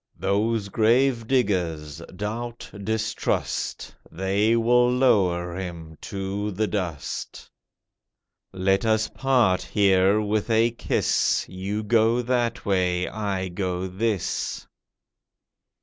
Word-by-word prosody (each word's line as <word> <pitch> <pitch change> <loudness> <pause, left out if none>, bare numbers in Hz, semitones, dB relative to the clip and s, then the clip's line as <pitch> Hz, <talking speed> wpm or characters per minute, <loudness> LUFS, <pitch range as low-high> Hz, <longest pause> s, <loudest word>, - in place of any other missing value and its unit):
Those 105 +2 0
gravediggers, 110 - +1 0.2
Doubt, 115 +4 -5
Distrust, 110 +1 -2 0.2
They 100 +5 +1
will 120 +1 +4
lower 90 -9 +2
him 85 -4 -7
to 100 +1 -4
the 105 +2 -1
dust. 90 -9 -4 1.0
Let 95 +1 +1
us 110 -1 +1
part 120 -9 +2
here 100 0 +3
with 105 +1 -1
a 115 +1 +3
kiss— 120 - +1
You 100 +3 -4
go 115 +2 +3
that 120 -1 -1
way, 90 -2 +1
I 100 -3 -3
go 90 0 -3
this. 100 +1 -2
105 Hz, 95 wpm, -24 LUFS, 95-115 Hz, 1.0 s, will